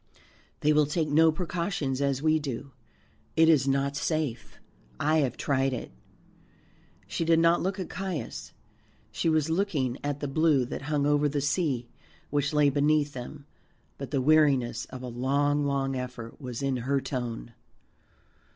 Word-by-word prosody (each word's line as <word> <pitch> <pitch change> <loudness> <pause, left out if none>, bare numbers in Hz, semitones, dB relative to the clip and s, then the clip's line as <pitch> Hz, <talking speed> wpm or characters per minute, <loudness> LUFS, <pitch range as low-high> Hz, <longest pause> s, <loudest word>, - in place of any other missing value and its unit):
They 150 +1 +4
will 150 -1 +4
take 155 +1 -1
no 160 +2 +5
precautions 165 -5 -2
as 140 0 0
we 155 0 +3
do. 140 -1 -5 0.7
It 160 0 +6
is 150 -4 +4
not 140 +1 +1
safe; 150 -5 -2 0.4
I 155 +1 +2
have 130 -5 0
tried 135 -1 0
it." 125 - -5 1.1
She 100 - -3
did 165 0 +4
not 165 +1 +4
look 195 +2 -2
at 185 - -3
Caius, 160 - -5 0.6
she 165 - 0
was 155 0 +1
looking 155 -9 0
at 145 0 -2
the 145 - -3
blue 145 -2 +2
that - - -6
hung 145 -2 +1
over 145 0 +3
the 145 0 -1
sea 140 -4 0 0.4
which 145 -1 +1
lay 150 -2 +4
beneath 145 +1 +2
them, 135 +3 -8 0.5
but 135 - -5
the 135 -3 0
weariness 140 -6 +3
of 130 -1 -9
a - - -5
long 140 +4 +1
long 135 -1 -1
effort 125 -1 -7
was 125 0 -5
in 135 -2 0
her 135 +3 0
tone. 120 - -5
145 Hz, 160 wpm, -28 LUFS, 130-155 Hz, 1.1 s, It